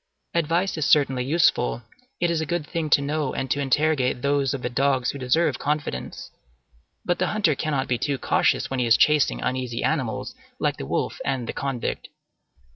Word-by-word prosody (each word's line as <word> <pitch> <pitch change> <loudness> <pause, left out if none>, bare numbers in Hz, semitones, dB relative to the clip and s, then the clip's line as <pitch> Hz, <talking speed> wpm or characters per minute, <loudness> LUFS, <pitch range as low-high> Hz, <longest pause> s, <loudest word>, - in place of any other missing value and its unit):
Advice 170 +2 0
is 150 - 0
certainly 135 -4 +3
useful; 135 -5 +2 0.4
it 175 -1 +1
is 165 -1 0
a - - -1
good 170 -2 -2
thing 165 -1 -3
to 140 - +4
know 145 -1 -2
and 135 -1 -3
to 145 - +1
interrogate 135 -2 +1
those 140 -2 +1
of 135 - -4
the - - 0
dogs 130 0 +1
who 140 - -8
deserve 130 +2 +1
confidence; 145 - -3 0.7
but 175 - 0
the 185 - +1
hunter 205 -7 +2
cannot 140 -1 -1
be 125 -2 0
too 140 -2 -1
cautious - - +1
when 135 - -3
he 125 - +1
is 115 - +6
chasing 150 -2 +3
uneasy 125 -2 -2
animals - - -1 0.2
like - - -1
the 65 - -6
wolf - - -2
and 135 -3 -2
the - - -3
convict. 135 -4 -3
140 Hz, 190 wpm, -24 LUFS, 130-155 Hz, 0.7 s, is